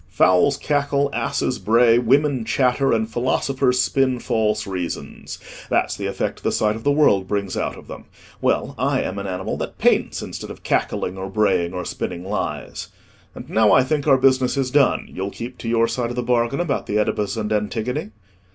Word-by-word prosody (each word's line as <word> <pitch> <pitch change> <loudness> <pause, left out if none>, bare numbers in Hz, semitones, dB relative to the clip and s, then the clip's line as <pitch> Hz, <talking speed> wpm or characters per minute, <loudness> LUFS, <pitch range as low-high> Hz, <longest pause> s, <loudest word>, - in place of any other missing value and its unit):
Fowls 95 +10 +3
cackle, 140 -1 0
asses - - -1
bray, 115 +1 +4
women 135 +1 +2
chatter, 130 +3 +1
and 110 -1 +1
philosophers 130 +2 0
spin 130 -1 +2
false 105 -2 0
reasons—that's 90 -3 -4
the - - -4
effect - - -3
the - - 0
sight 105 -1 +1
of 110 - -8
the 145 - +3
world 100 -11 +3
brings 100 -2 -2
out - - -2
of - - -13
them. - - -10 0.4
Well, - - 0
I - - +1
am 100 +2 -4
an 100 - -5
animal 95 0 -3
that - - -5
paints - - +1
instead - - -7
of - - -10
cackling, 95 +1 -1
or 95 +1 -5
braying, 95 -4 +1
or 90 -1 -4
spinning 90 -1 -4
lies. 105 +2 -4 0.5
And - - -9
now, 110 -1 +3
I 130 - +6
think, 145 +2 -1
our 135 -2 +6
business 130 0 +2
is 130 -2 0
done; 140 -1 +2
you'll 95 +2 -5
keep 120 +4 -8
to 115 - -4
your 115 0 +3
side 120 -1 -2
of 120 - -5
the 125 - -2
bargain 120 +3 +1
about 165 -6 -1
the 105 - 0
Oedipus 105 -1 -1
and 110 -1 -1
Antigone?" 120 - -2
115 Hz, 190 wpm, -21 LUFS, 105-135 Hz, 0.5 s, I